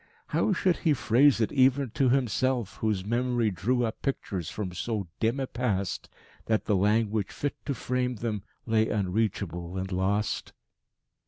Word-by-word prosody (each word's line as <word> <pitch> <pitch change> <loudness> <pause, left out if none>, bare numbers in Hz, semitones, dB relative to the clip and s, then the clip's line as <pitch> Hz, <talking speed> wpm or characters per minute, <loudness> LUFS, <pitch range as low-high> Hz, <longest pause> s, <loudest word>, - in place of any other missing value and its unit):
How - - +2
should 185 -1 +2
he 160 -4 +2
phrase 130 +3 +4
it 110 - +1
even 130 -1 +3
to 135 0 +2
himself, 125 -3 +1
whose 105 -4 -1
memory 120 0 +1
drew 120 +7 +1
up 110 - -5
pictures 95 - -3
from 95 -4 -4
so 105 +2 -2
dim 115 +4 +1
a 135 - 0
past 105 -7 -2 0.4
that 110 -1 +1
the 105 - +2
language 105 +1 +2
fit 145 - -3
to 140 - 0
frame 125 +1 -1
them 110 -2 -3 0.2
lay 110 -1 +2
unreachable 95 -3 -1
and 95 +1 -3
lost? 100 +3 -1
110 Hz, 155 wpm, -28 LUFS, 100-125 Hz, 0.4 s, phrase